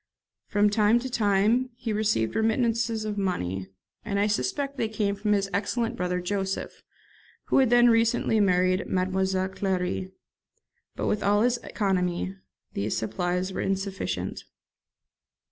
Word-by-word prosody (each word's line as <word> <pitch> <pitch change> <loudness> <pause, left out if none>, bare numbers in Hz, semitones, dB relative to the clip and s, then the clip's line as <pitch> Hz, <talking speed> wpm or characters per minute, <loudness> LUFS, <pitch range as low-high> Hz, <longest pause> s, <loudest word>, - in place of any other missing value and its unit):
From 205 0 +2
time 210 +2 +4
to 260 +1 -5
time 220 +3 +2
he 235 -3 -3
received 210 - 0
remittances 225 0 +1
of 210 -1 -3
money, 95 - -2 0.4
and 200 -2 -2
I 205 - +3
suspect 280 - -1
they 225 - 0
came 210 -2 0
from 210 +1 0
his 200 -1 +1
excellent 230 +4 -1
brother 180 -2 -1
Joseph, 195 +1 -3 0.7
who - - +4
had 260 -3 +4
then 240 0 +6
recently 230 -1 +3
married 185 -1 +2
Mademoiselle 190 0 0
Clary; 185 -1 -2 0.8
but - - -3
with 210 - 0
all 205 +2 +3
his 245 0 +2
economy 185 -4 -1 0.4
these 105 +2 -2
supplies 180 - -2
were - - -2
insufficient. 195 0 -3
205 Hz, 135 wpm, -26 LUFS, 185-225 Hz, 0.8 s, then